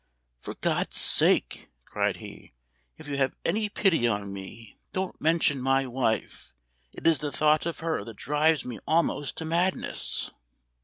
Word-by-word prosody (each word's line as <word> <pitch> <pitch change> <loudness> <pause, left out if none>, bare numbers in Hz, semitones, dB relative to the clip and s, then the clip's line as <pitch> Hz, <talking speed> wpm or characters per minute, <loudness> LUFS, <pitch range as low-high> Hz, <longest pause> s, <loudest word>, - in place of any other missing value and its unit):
"For - - -7
God's - - 0
sake!" - - +2 0.2
cried - - -1
he, - - -12 0.4
"if - - -12
you 140 -1 -3
have 135 -1 +1
any 210 +4 +1
pity 180 - +2
on 100 -3 -2
me 100 +3 -10
don't 190 0 -3
mention 155 -3 +2
my 135 +1 +2
wife; 125 -3 -2 0.4
it - - -12
is 165 -2 +5
the 150 -1 -3
thought 155 +2 +3
of 170 - -5
her 165 -1 -1
that 115 - -9
drives 150 +2 +2
me 125 -2 -6
almost 160 -3 +1
to 160 - -4
madness!" 175 +3 0
150 Hz, 155 wpm, -27 LUFS, 125-165 Hz, 0.4 s, is